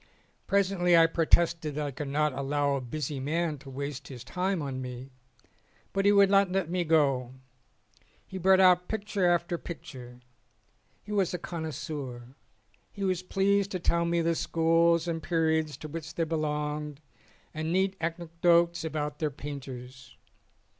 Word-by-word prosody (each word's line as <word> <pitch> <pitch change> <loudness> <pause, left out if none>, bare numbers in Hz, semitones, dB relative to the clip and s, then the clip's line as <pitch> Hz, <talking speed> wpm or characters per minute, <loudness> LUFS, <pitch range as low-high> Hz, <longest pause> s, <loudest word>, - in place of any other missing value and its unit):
Presently 185 -3 +3
I 165 - +7
protested 165 -1 +2
that 150 0 -2
I 145 - -3
could 140 +2 -5
not 150 +1 +1
allow 140 +1 0
a 140 - -1
busy 140 +2 -4
man 155 +2 -1
to 135 0 -12
waste 140 0 -5
his 125 -4 -9
time 185 +6 -1
on 135 -3 -4
me, 125 +1 -7 0.8
but 195 0 0
he 205 - +6
would 200 -1 +5
not 195 -2 +4
let 185 -3 -1
me 180 -1 0
go. 135 -6 +2 0.9
He 190 - -7
brought 190 +1 +5
out 180 -1 +5
picture 205 -3 -1
after 175 0 0
picture. 125 -7 -9 0.8
He 210 - -10
was 195 -4 +1
a - - -1
connoisseur. 150 -7 -6 0.6
He 200 - -6
was 185 -2 0
pleased 195 +2 +1
to 185 - -1
tell 170 0 +1
me 170 0 +1
the 165 0 +2
schools 165 +1 +2
and 165 -1 -2
periods 160 -3 0
to 155 - -8
which 160 +1 -7
they 165 - +1
belonged 150 -2 -2 0.5
and 155 +1 -3
neat 190 +2 +1
anecdotes 170 +1 +1
about 150 -2 -3
their 155 - 0
painters. 130 -2 -9
160 Hz, 155 wpm, -28 LUFS, 145-175 Hz, 0.9 s, I